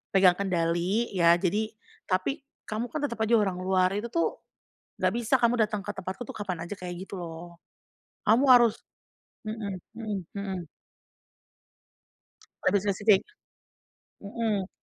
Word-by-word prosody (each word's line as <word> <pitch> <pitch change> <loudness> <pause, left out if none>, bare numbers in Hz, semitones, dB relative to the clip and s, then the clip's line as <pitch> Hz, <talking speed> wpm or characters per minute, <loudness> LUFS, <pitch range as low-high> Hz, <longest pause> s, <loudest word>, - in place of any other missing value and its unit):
pegang 185 -1 +6
kendali, 180 +4 0
ya 170 -3 +5
jadi 200 +5 0 0.4
tapi 185 +9 0 0.2
kamu 220 +3 -3
kan 310 - -2
tetap 235 -5 -2
aja 230 +2 +4
orang 190 -3 0
luar. 185 0 +2
Itu 215 +3 -2
tuh 335 - +2 0.7
nggak 185 +2 +1
bisa 240 +2 +2
kamu 240 0 +3
dateng 210 -1 0
ke - - -6
tempatku 190 +7 -6
tuh - - -8
kapan 180 -5 -4
aja, 205 - -5
kayak 180 -1 -6
gitu - - -13
loh. 170 +1 -9 0.6
Kamu 230 +6 +4
harus" 240 -3 +6 0.7
mhm 215 -3 -4 0.2
mhm 220 -3 -3 0.2
mhm. 190 -5 -4 2.0
Lebih 200 +2 +4
spesifik 205 0 +3 1.0
hmm. 205 -2 -1
200 Hz, 135 wpm, -28 LUFS, 185-225 Hz, 2.0 s, pegang